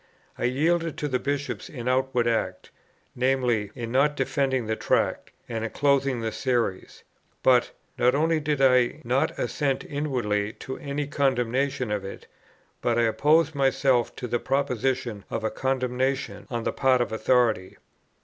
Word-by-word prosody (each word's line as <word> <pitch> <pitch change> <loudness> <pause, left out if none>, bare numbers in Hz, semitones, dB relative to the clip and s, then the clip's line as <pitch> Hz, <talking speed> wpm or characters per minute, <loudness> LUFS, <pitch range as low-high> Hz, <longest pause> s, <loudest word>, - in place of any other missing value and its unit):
I - - -2
yielded 165 +6 +1
to 150 - -2
the 130 -3 0
Bishops 140 +2 -3
in 125 -4 -7
outward 130 -2 +1
act, 95 -5 -2 0.4
viz. 125 -5 +1
in 115 -1 -5
not 140 +3 +3
defending 135 -2 0
the 110 0 -1
Tract, - - 0 0.2
and 115 -2 -3
in 115 - -2
closing 140 -3 +1
the 110 -1 -2
Series; 120 -8 -2 0.4
but, 125 -2 +4 0.3
not 125 +2 +4
only 160 +2 +2
did 150 -2 -1
I 130 +2 +3
not 125 +3 0
assent 135 +2 -1
inwardly 115 -8 -1
to 130 - -7
any 145 +1 -3
condemnation 130 -2 0
of 105 -2 -1
it, 100 - -8 0.6
but 120 -1 +1
I 120 - +3
opposed 155 +8 +3
myself 135 -3 +2
to 125 - -5
the 120 +1 0
proposition 130 -5 -1
of - - -3
a 110 - 0
condemnation 130 +1 -1
on 120 -3 -3
the - - -1
part 130 -2 +3
of 120 - -1
authority. 110 -4 +1
130 Hz, 155 wpm, -26 LUFS, 120-140 Hz, 0.6 s, but